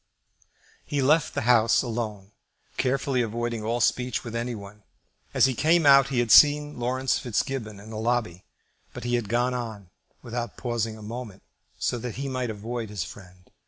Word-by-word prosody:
He 145 - -3
left 150 +4 +2
the - - 0
House 115 -1 +4
alone, 110 -5 -4 0.4
carefully 130 0 0
avoiding 120 0 -2
all 115 +3 -1
speech 125 +1 0
with 115 -1 -7
any 120 +1 -2
one. 100 0 -11 0.5
As - - +4
he 130 - +1
came 160 +5 +3
out 140 -1 +7
he 135 -2 -3
had 120 -2 +1
seen 150 -1 +6
Laurence 130 +2 0
Fitzgibbon 115 -3 -3
in 105 +2 -11
the 110 - -5
lobby, 110 -6 -1 0.5
but - - -7
he 120 0 -2
had 120 -4 0
gone 120 +2 +1
on 110 -7 -6 0.3
without 120 -2 -5
pausing 115 -3 -2
a 110 - -11
moment, 110 -2 -7 0.3
so 120 - -1
that 120 -1 -5
he 140 +2 -4
might 130 -2 -2
avoid 110 +1 -5
his 100 -4 -3
friend. 90 -1 -13
120 Hz, 175 wpm, -26 LUFS, 110-125 Hz, 0.5 s, out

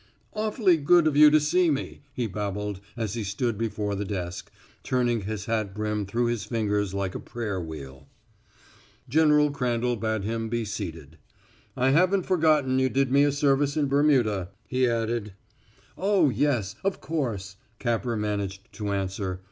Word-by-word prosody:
"Awfully 215 -4 +2
good 160 +3 +4
of 155 -2 +2
you 150 +1 +9
to 155 +1 +5
see 170 +4 +2
me," 145 -1 -3
he 125 -2 -2
babbled 105 -1 -3 0.2
as 110 -3 -2
he 115 -2 -3
stood 105 +4 -1
before 105 -1 -2
the 100 +1 -2
desk, 90 -3 -5 0.3
turning 120 -3 0
his 105 0 -4
hat 110 -4 -2
brim 105 -1 -2
through 120 +5 0
his 120 -3 -1
fingers 105 -3 -1
like 95 -2 -2
a - - -5
prayer 105 -6 -4
wheel. 70 - -9 1.0
General 150 +1 +4
Crandall 125 -3 0
bade 110 -1 -1
him 115 +1 -2
be 115 0 -1
seated. 85 -7 -6 0.6
"I 130 +1 +3
haven't 185 +5 +3
forgotten 155 -7 +2
you 130 0 +2
did 135 -1 +1
me 140 +1 +5
a 145 - +2
service 140 0 +1
in 150 - +2
Burma," 130 -10 +2 0.2
he 130 -1 +2
added. 115 -2 -2 0.6
"Oh, 190 -5 +3
yes 120 -6 0
of 195 0 -1
course," 110 - -3 0.2
Capper 120 0 -1
managed 100 -2 -3
to 105 -2 -3
answer. 95 -1 -3
115 Hz, 160 wpm, -26 LUFS, 100-140 Hz, 1.0 s, you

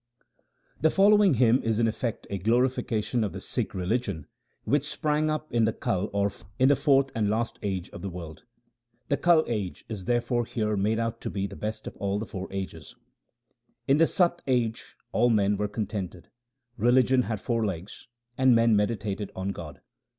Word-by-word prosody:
The 160 - +4
following 200 -2 +5
hymn 120 +1 +4
is 115 -1 0
in 115 0 +3
effect 115 +1 -3
a 100 - -2
glorification 120 +1 +1
of 105 - -3
the - - -5
Sikh - - -4
religion 95 - -2 0.4
which - - 0
sprang 155 0 0
up 155 0 -3
in 115 -2 +3
the 110 - +1
Kal 95 +2 -1
or 100 0 +1
fourth 135 - +2
and 105 -2 0
last 115 +2 -1
age 95 -4 -3
of - - -9
the 100 - -4
world. 85 -2 -9 0.7
The 140 - +2
Kal 170 -2 +4
age 105 -6 -3
is 100 -5 -6
therefore 120 0 +1
here 110 -2 -1
made 105 +3 +1
out 115 0 -2
to - - -3
be 100 -1 -2
the - - -7
best 110 0 -5
of - - -7
all 100 0 -1
the 110 - -3
four 95 -3 -7
ages: 95 -1 -6 0.4
— - - -47
In 135 - +4
the 165 +1 +5
Sat 175 -1 +1
age 120 -4 -1 0.2
all 120 +2 +3
men 105 -2 +3
were 105 +1 -1
contented; 100 -4 -5 0.5
religion 125 +3 +4
had 110 -4 -3
four 115 +1 -1
legs, 95 -2 -5 0.3
and 130 -2 +6
men 115 -1 +4
meditated 105 -1 -1
on 95 +1 -3
God. 80 -7 -7
110 Hz, 180 wpm, -27 LUFS, 100-125 Hz, 0.7 s, and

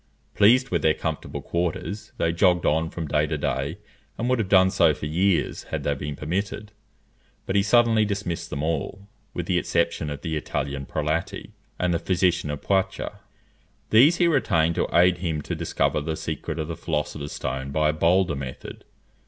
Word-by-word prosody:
Pleased 125 +6 +4
with - - +1
their 80 0 +3
comfortable 80 -2 -4
quarters, 90 +4 -3
they 85 - +1
jogged 90 0 +3
on 80 +2 +2
from 80 -2 -5
day 75 +1 +1
to 75 0 -2
day, 70 -1 -2 0.4
and 120 - -2
would 130 -1 +2
have 100 -4 -1
done 95 -1 +5
so 80 -6 +4
for - - -6
years, 90 +4 0
had - - -4
they 70 - +1
been 70 +1 -5
permitted. 100 +7 -3 0.7
But 95 - -2
he 100 - +5
suddenly 115 +1 +4
dismissed 95 -5 -3
them 70 - -4
all, 85 +5 -3 0.3
with - - -3
the - - +1
exception 85 -2 0
of 70 -1 -6
the 80 -1 -3
Italian 70 -2 -3
Prelati, 80 +2 -2 0.3
and 90 -1 0
the 85 - 0
physician 90 -3 +1
of 75 -1 -5
Poitou. 95 -1 0 0.8
These 135 +10 +7
he 175 - +4
retained 85 - +2
to - - -1
aid 90 +1 +4
him 80 -4 -2
to - - -4
discover - - 0
the 80 +1 -3
secret - - -4
of 80 -2 -3
the 85 - -4
philosopher's 75 -2 -3
stone 65 +1 -4
by 75 +2 +1
a - - +1
bolder 85 +1 +2
method. 65 -2 -8
85 Hz, 185 wpm, -24 LUFS, 75-95 Hz, 0.8 s, These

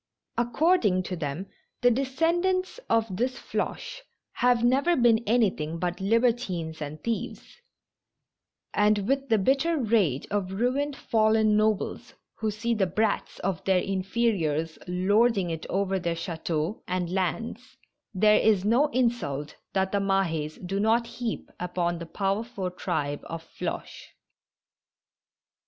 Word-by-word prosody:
According 240 - +2
to 180 - -4
them, 155 +2 -4 0.4
the 245 -1 +5
descendants 340 - 0
of 220 -5 +1
this 255 +3 -1
Floche - - -4 0.3
have 245 -1 +2
never 275 +8 +3
been 235 -3 +4
anything 190 -9 +1
bat 175 +1 -2
libertines 200 -7 0
and 150 +1 -6
thieves; 230 - -4 1.2
and 210 -1 +2
with 275 +1 0
the 225 - +4
bitter 275 - +2
rage 210 - +1
of 195 -2 -1
ruined, 265 +7 0
fallen 220 -3 +3
nobles 215 -1 0 0.2
who 220 - 0
see 225 +3 -1
the 200 -4 +1
brats 210 +4 -1
of 185 -3 -2
their 190 -1 +4
inferiors 185 -6 -1
lording 195 +1 +2
it 160 +1 -5
over 195 0 0
their 170 -1 -1
chateaux 165 +1 -3
and 180 -1 -2
lands, 230 +7 -3 0.3
there 210 +1 +4
is 205 -3 +3
no 240 +8 +4
insult 230 - -1 0.2
that 190 0 +1
the 200 - +1
Mahds 175 -6 0
do 195 +2 -2
not 225 +3 +3
heap 235 -1 -5
upon 175 -1 -1
the 170 - -7
powerful 195 +1 -2
tribe 145 -5 -2
of 165 -1 -6
Floche. - - -6
210 Hz, 130 wpm, -27 LUFS, 180-235 Hz, 1.2 s, the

